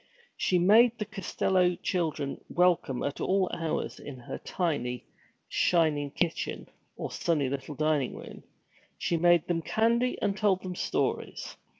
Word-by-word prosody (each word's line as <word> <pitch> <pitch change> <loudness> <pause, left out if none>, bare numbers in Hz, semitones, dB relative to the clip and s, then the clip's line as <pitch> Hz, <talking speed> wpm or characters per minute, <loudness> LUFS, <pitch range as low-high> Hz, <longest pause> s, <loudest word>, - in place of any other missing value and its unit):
She 180 - +1
made 220 +7 +5
the 210 - -3
Costello 190 -3 +1
children 160 -7 -2
welcome 175 -8 +2
at 140 - -3
all 190 -1 +1
hours 165 -2 -2
in 140 -3 -8
her 120 - -7
tiny, 135 -9 -2 0.4
shining 155 -4 +2
kitchen, 165 +3 -2 0.3
or - - -4
sunny 150 -6 0
little 140 +2 -5
dining 155 -3 0
room. - - -10 0.6
She 170 - 0
made 175 -1 +4
them 170 -2 0
candy 235 +7 +1
and 200 - 0
told 200 -3 +1
them 185 -1 -4
stories. - - -2
175 Hz, 135 wpm, -29 LUFS, 150-190 Hz, 0.6 s, made